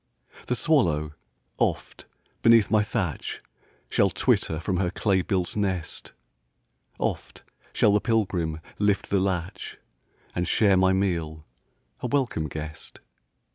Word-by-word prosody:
The 125 - 0
swallow, 85 - +1 0.5
oft, - - -1 0.4
beneath 115 -2 +5
my 110 -1 +5
thatch, 105 - -3 0.4
Shall - - +2
twitter 80 - +1
from 90 +2 -1
her 90 -1 +1
clay 95 0 +1
built 90 -1 -1
nest; 95 -5 -3 0.8
Oft - - -4 0.3
shall 105 - +3
the 105 - +3
pilgrim 90 -9 0 0.2
lift 105 -1 +1
the 100 - +3
latch, 95 0 -3 0.6
And 90 -1 -1
share 100 -1 +4
my 95 0 +4
meal, 85 -5 -1 0.5
a - - -3
welcome 120 - 0
guest. 75 +1 -8
95 Hz, 120 wpm, -26 LUFS, 85-105 Hz, 0.8 s, beneath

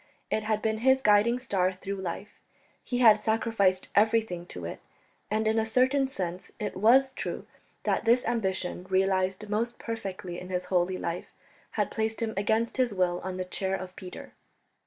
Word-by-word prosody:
It 215 - 0
had 215 -1 0
been 220 0 0
his 265 +3 +4
guiding 210 +3 +5
star 195 -7 0
through 195 +1 -5
life; 190 +3 -6 0.4
he 245 - -2
had 220 -4 +7
sacrificed 215 -4 +1
everything 210 -5 +2
to 90 - -7
it; 85 - -6 0.5
and 215 +1 0
in 220 +1 +3
a 220 - +1
certain 260 +4 +3
sense 185 -7 -5
it 210 - -3
was 255 +7 +5
true - - -5 0.4
that - - +1
this 240 +2 +3
ambition, 190 -5 -2
realized 190 +1 +1
most 225 +3 -1
perfectly 190 -6 -5
in 180 - -9
his 180 -1 -2
holy 180 +1 +2
life, 170 0 -4 0.5
had - - 0
placed 220 0 -1
him 225 -1 -2
against 220 +5 +1
his 250 -5 +1
will 180 -1 +1
on 185 0 -4
the 185 - -3
chair 190 +1 -1
of 185 -1 -7
Peter. 180 -1 -9
205 Hz, 175 wpm, -28 LUFS, 185-225 Hz, 0.5 s, had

